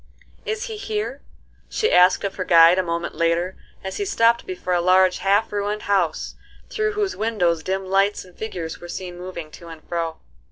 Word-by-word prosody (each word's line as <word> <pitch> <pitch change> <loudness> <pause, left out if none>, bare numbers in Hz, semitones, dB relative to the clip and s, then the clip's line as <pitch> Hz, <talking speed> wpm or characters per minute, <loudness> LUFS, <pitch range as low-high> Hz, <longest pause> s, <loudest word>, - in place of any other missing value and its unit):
"Is 435 +1 -2
he 450 -3 -6
here?" 230 - -4 0.5
she 440 - 0
asked 180 +1 +5
of 200 - -2
her 185 - -3
guide 170 +1 +6
a - - +4
moment 170 -1 -3
later, 170 +2 0 0.3
as 190 - -5
he 405 - -2
stopped 235 - +2
before 365 - -3
a 175 - +2
large, 185 +1 +4
half 200 +3 +2
ruined 205 +1 -2
house, 185 -6 0 0.4
through 430 0 0
whose 415 -2 -1
windows 180 -7 0
dim 190 +2 -2
lights 195 +2 +1
and 180 -1 -18
figures 175 -7 -6
were 175 - -9
seen 180 -1 -6
moving 175 -3 -8
to 170 - -12
and 165 -1 -11
fro. 165 -1 -3
185 Hz, 190 wpm, -22 LUFS, 170-220 Hz, 0.5 s, guide